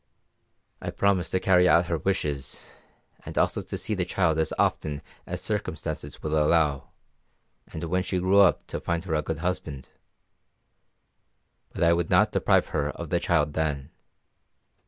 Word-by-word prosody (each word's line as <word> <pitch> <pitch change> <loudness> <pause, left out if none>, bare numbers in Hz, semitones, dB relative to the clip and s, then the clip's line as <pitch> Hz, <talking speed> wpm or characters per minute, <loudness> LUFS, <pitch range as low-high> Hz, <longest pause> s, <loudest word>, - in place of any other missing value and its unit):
"I - - -4
promised 100 -3 +1
to 95 - +2
carry 90 -1 +4
out 85 +1 +5
her 85 -2 -2
wishes, 75 -8 -3 0.5
and - - -9
also - - +1
to - - -6
see 110 - -2
the 95 -3 0
child 85 -3 +1
as 80 - 0
often 75 -2 0 0.2
as - - -4
circumstances - - -4
would 75 - -3
allow, 75 -2 +2 0.8
and 80 - -7
when 90 +2 0
she 95 0 -2
grew 95 +3 +3
up 100 - +4
to - - -5
find 85 -1 -2
her 90 -4 -4
a 75 - +2
good 80 +1 -4
husband. 75 -7 -3 1.8
But - - -2
I 85 0 +5
would 85 -1 -1
not - - +4
deprive - - +2
her 75 -1 -1
of 85 +1 -7
the 85 - +2
child 75 -4 +1
then. 75 -2 -2
85 Hz, 160 wpm, -26 LUFS, 75-90 Hz, 1.8 s, out